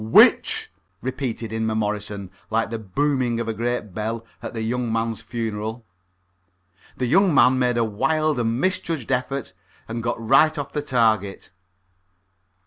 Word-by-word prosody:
"Which?" 110 - +5 0.3
repeated 120 -4 -3
Inmemorison, 105 -3 -2 0.2
like 110 +1 0
the 115 - -3
booming 120 +3 0
of 115 - -2
a 115 - -1
great 115 -3 -2
bell 110 +3 -3 0.2
at - - -6
a - - -1
young 120 +1 -1
man's 115 0 -1
funeral. 110 0 -4 1.1
The 130 - 0
young 175 +5 +4
man 130 -1 +5
made 125 -1 +2
a 115 - +3
wild 140 +7 +1
and 115 0 0
misjudged 165 -7 -1
effort, 130 +1 -1 0.3
and 115 +1 -4
got 120 0 -2
right 135 +7 +4
off 145 -2 -4
the 150 - -1
target. 110 -9 +1
115 Hz, 140 wpm, -23 LUFS, 110-130 Hz, 1.1 s, Which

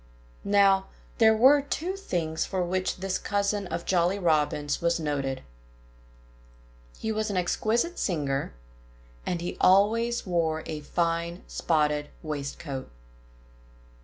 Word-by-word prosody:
Now, 195 -1 +4 0.3
there 220 -1 +6
were 275 +5 +6
two 330 +6 -3
things 170 - -2
for 185 -2 -1
which 185 +1 -1
this 190 -1 -1
cousin 200 -1 -1
of 170 0 -4
Jolly 180 +1 +2
Robin's 150 -4 +1
was 170 0 +1
noted. 140 -4 -2 1.5
He 220 - -3
was 215 0 -1
an 200 - -2
exquisite 225 - 0
singer; 140 -7 -1 0.8
and 175 -1 -1
he 175 - -4
always 225 +5 +3
wore 165 -3 0
a 155 -1 -4
fine, 170 +3 -2
spotted 150 -2 0
waistcoat. 140 -2 -5
175 Hz, 115 wpm, -27 LUFS, 155-205 Hz, 1.5 s, there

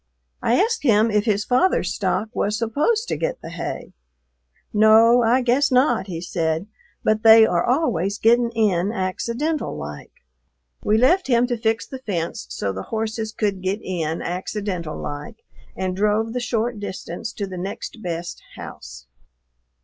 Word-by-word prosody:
I 240 - +2
asked 455 +4 +1
him 225 -3 +3
if 210 0 +1
his 210 -2 +1
father's 340 +10 +2
stock 220 - -1
was 210 +1 0
supposed 295 - 0
to - - -1
get - - -2
the - - -7
hay. - - -6 0.8
"No, 220 +3 +6
I 240 +3 +3
guess 260 +4 +2
not," 250 -5 +3
he 170 -3 -5
said, 165 -1 -1 0.4
"but 215 0 +2
they 225 0 +8
are 175 -5 +1
always 205 - 0
getting 235 +2 +3
in 200 -3 +2
accidental 235 - -2
like." 75 0 -8 0.7
We 215 - +3
left 335 +11 +3
him 240 -2 +3
to 245 -1 -1
fix 225 0 0
the 265 - -8
fence 170 - -4
so 95 +11 -2
the 95 - -5
horses 220 0 -3
could 205 -4 -2
get 190 +3 -1
in 165 -3 -3
"accidental 180 -2 -4
like," 145 +10 -7 0.3
and 185 -1 -2
drove 210 +3 +1
the 250 - -1
short 235 -2 -1
distance 205 0 -6
to 205 - -3
"the 185 -2 -7
next 195 +4 -6
best 170 -2 -5
house." - - -10
215 Hz, 155 wpm, -22 LUFS, 185-240 Hz, 0.8 s, they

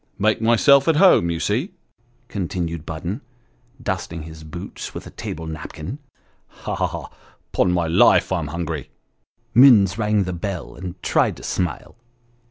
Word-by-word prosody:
Make 110 +2 +1
myself 135 +5 +5
at 165 - +4
home, 160 - +5
you 85 -1 -2
see! 125 - -1 0.3
" 120 - -39 0.2
continued 85 -5 -4
Budden, 85 - -4 0.6
dusting 95 -8 -4
his 80 0 -10
boots 80 +3 -8
with - - -6
a - - -10
table 80 +1 -6
napkin. 80 - -7 0.3
" - - -40 0.2
Ha! - - -3
ha! - - 0
ha! - - -7 0.4
'pon 90 - +2
my 90 -1 +1
life, 80 +3 +4
I'm 85 -5 -1
hungry." 85 +1 -4 0.6
Minns 115 -5 +6
rang 105 -1 +2
the 90 0 -4
bell, 90 +1 -5
and 90 0 -7
tried - - +2
to - - -12
smile. 90 -3 -3
90 Hz, 160 wpm, -22 LUFS, 85-110 Hz, 0.6 s, Minns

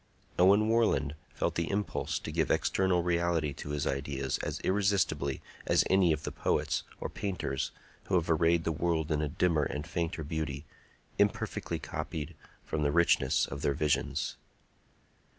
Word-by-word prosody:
Owen 100 +4 +6
Warland 115 -10 +2 0.2
felt - - 0
the 85 -1 -1
impulse 100 +1 -1
to - - -5
give - - 0
external 95 -2 +2
reality 85 -3 +1
to 75 - -8
his 75 0 -1
ideas 70 -1 -2
as - - -3
irresistibly 95 -9 +1 0.2
as - - +4
any 95 -3 +5
of 75 -1 -1
the - - -3
poets - - 0 0.2
or - - -3
painters 90 -9 -3 0.4
who 95 - 0
have 85 -2 +2
arrayed 85 0 +3
the 80 - 0
world 80 0 0
in 75 -1 +1
a 75 - -1
dimmer 80 +1 +2
and 75 0 -2
fainter 85 -1 -2
beauty, 75 -2 -3 0.5
imperfectly - - 0
copied 75 -3 -5 0.3
from 80 - -2
the 70 -1 +2
richness 80 -5 +3
of 70 +1 -6
their 70 - +1
visions. 75 +1 0
80 Hz, 155 wpm, -31 LUFS, 75-90 Hz, 0.5 s, Owen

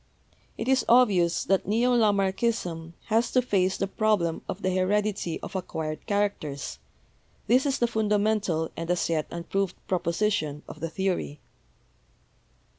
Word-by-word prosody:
It 225 - -4
is 265 -1 +3
obvious 200 -9 +4
that 195 -1 +1
neo 235 +4 +2
Lamarckism 195 -5 0
has 225 +2 +2
to 255 - +5
face 190 -5 +1
the - - 0
problem 195 -5 0
of 190 - -5
the 185 - +1
heredity 195 -1 0
of - - -7
acquired 160 -4 -4
characters 200 -9 -2 0.3
— - - -37
this 255 +4 +4
is 275 - +1
the 240 - +2
fundamental 210 -6 0
and 165 0 -5
as 180 -1 +1
yet 155 -2 0
unproved 180 +3 -2
proposition 170 -4 -1
of 155 - -10
the 165 +1 -3
theory. 180 -5 -2
195 Hz, 140 wpm, -27 LUFS, 170-215 Hz, 0.3 s, to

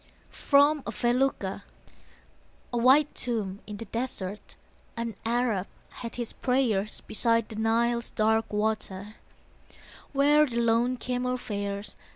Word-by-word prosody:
FROM 285 +2 +4
A - - -2
FELUCCA 240 -5 0 1.1
A - - +1
white 270 +5 +5
tomb 210 -5 -2
in 210 -1 -6
the 230 - -7
desert, 210 -3 -5 0.4
An 230 -2 -3
Arab 230 -5 +1 0.4
at 230 - -5
his 240 -2 -4
prayers 235 -6 0
Beside 230 0 +1
the 220 - -7
Nile's 235 +2 +1
dark 220 +1 +1
water, 210 -1 -2 0.9
Where 295 +2 +4
the 235 -3 -4
lone 235 +2 +2
camel 250 +1 -1
fares. 200 -3 -4
230 Hz, 120 wpm, -28 LUFS, 210-250 Hz, 1.1 s, white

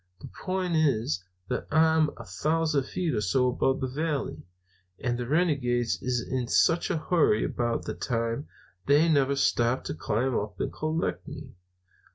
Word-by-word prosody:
The - - -10
point 185 -2 -2
is 110 - +1 0.2
that - - -3
I'm 160 0 +4
a - - -9
thousand 155 -3 0
feet 175 -4 -2
or 105 - 0
so 125 +6 +2
above 130 +1 0
the 130 - 0
valley, 145 - -3 0.5
and 120 -1 -1
the 120 0 -4
renegades 135 -7 +1
is 125 -1 0
in 130 -2 -2
such 165 +6 +3
a - - 0
hurry 155 -9 +2
about 120 -1 -1
that - - -6
time 115 +3 -1 0.4
that 140 - +5
they 155 +3 +5
never 140 -3 +3
stop 120 -2 +1
to - - -4
climb 115 +10 -1
up 100 -3 -3
and - - -2
collect 155 +1 -2
me. - - -9
135 Hz, 170 wpm, -27 LUFS, 120-160 Hz, 0.5 s, that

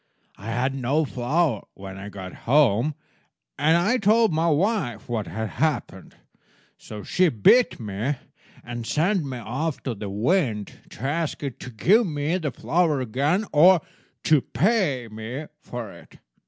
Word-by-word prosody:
I 105 - -10
had 125 +4 0
no 135 +4 0
flour 135 - 0
when 95 0 -9
I 100 +2 -7
got 95 -2 -8 0.2
home, 140 0 +4 0.6
and 160 +3 +4
I 210 +9 +2
told 220 -1 +4
my 165 +2 +2
wife 155 - 0
what 115 -4 -2
had 110 -1 -4
happened; 145 - -2 0.6
so 105 -2 -9
she 180 -1 +2
beat 155 - +4
me, 110 +6 -2 0.5
and 120 -1 -6
sent 175 +4 +1
me 135 -3 -5
off 135 +7 -3
to 130 - -2
the 105 -1 -6
wind 110 - 0 0.2
to - - -13
ask 155 +2 -2
it 140 -3 -5
to - - -8
give 195 - +3
me 150 +1 -1
the 155 -4 -2
flour 160 +2 +1
again 140 - 0
or 170 +3 +7 0.4
to 155 -3 +4
pay 150 - +1
me 110 +7 -6 0.2
for 120 -4 -7
it. - - -16
140 Hz, 155 wpm, -24 LUFS, 115-165 Hz, 0.6 s, or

